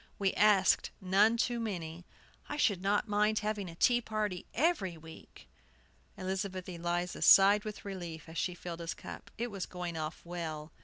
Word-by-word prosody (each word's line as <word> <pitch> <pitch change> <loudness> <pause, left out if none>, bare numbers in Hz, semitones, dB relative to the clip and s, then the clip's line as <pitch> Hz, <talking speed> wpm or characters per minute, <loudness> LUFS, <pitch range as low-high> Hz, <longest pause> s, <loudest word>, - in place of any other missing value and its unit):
We 195 -2 +1
asked 205 -2 +4
none 200 +5 +3
too 240 0 0
many. 175 -6 -5 0.4
I 295 - -3
should 200 -10 +2
not 205 +3 +1
mind 210 +1 +2
having 210 -3 -2
a 165 - -10
tea 240 +7 +3
party 210 -5 -3
every 235 - +1
week." 160 0 -14 0.7
Elizabeth 190 0 -3
Eliza 175 0 -3
sighed 200 +2 +7
with 215 -1 -7
relief 175 -5 -6
as 160 0 -5
she 180 - -1
filled 175 -1 -7
his 165 -1 -4
cup. - - -9
It 235 0 -3
was 195 -2 -4
going 180 -2 -5
off 155 +1 -4
well. 160 -3 -5
190 Hz, 165 wpm, -32 LUFS, 170-210 Hz, 0.7 s, sighed